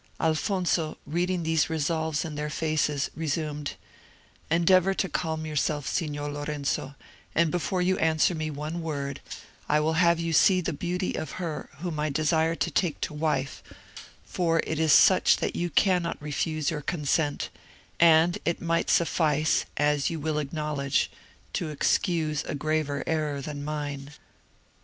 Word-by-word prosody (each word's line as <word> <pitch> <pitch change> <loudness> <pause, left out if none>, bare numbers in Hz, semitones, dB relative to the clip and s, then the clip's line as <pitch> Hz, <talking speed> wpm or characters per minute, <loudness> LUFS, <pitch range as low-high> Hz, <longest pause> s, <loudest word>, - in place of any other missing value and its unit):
Alfonso, 165 0 0
reading 175 +3 -1
these 160 -1 +1
resolves 160 0 -1
in 160 - -5
their 150 +1 -3
faces, 150 -2 0
resumed: 150 -2 -2 0.8
"Endeavour 185 +3 +4
to 190 - 0
calm 160 -1 -2
yourself, 150 -1 -1
Signor 145 -4 -2
Lorenzo; 145 -1 -3 0.4
and 165 -1 +3
before 180 +1 0
you 185 +1 +1
answer 160 +2 +3
me 155 -1 -3
one 155 +3 -4
word, 140 -3 -4 0.5
I 150 - +4
will 155 +1 +1
have 170 -1 +4
you 165 -1 -1
see 185 +3 +5
the 175 - -2
beauty 180 +5 -2
of 155 - -4
her 165 -4 -5
whom 170 -4 -3
I 150 +1 0
desire 160 +2 +1
to - - -1
take 175 -6 0
to - - -2
wife, 150 -3 -1 0.6
for 165 -2 0
it 160 - -2
is 160 -1 +3
such - - +6
that - - -2
you 175 0 -1
cannot 180 0 +2
refuse 150 +1 -1
your 150 -2 -3
consent, 150 -1 -1 0.5
and 165 +1 +5
it 170 - -1
might 165 -1 0
suffice, 155 -2 +2
as 145 -1 +2
you 165 - -4
will 150 0 -1
acknowledge, 150 -2 -1 0.4
to 165 - -2
excuse 155 0 0
a - - -3
graver 150 -1 -1
error 155 -3 -1
than 145 +1 -6
mine." 145 -1 -4
155 Hz, 150 wpm, -27 LUFS, 150-165 Hz, 0.8 s, such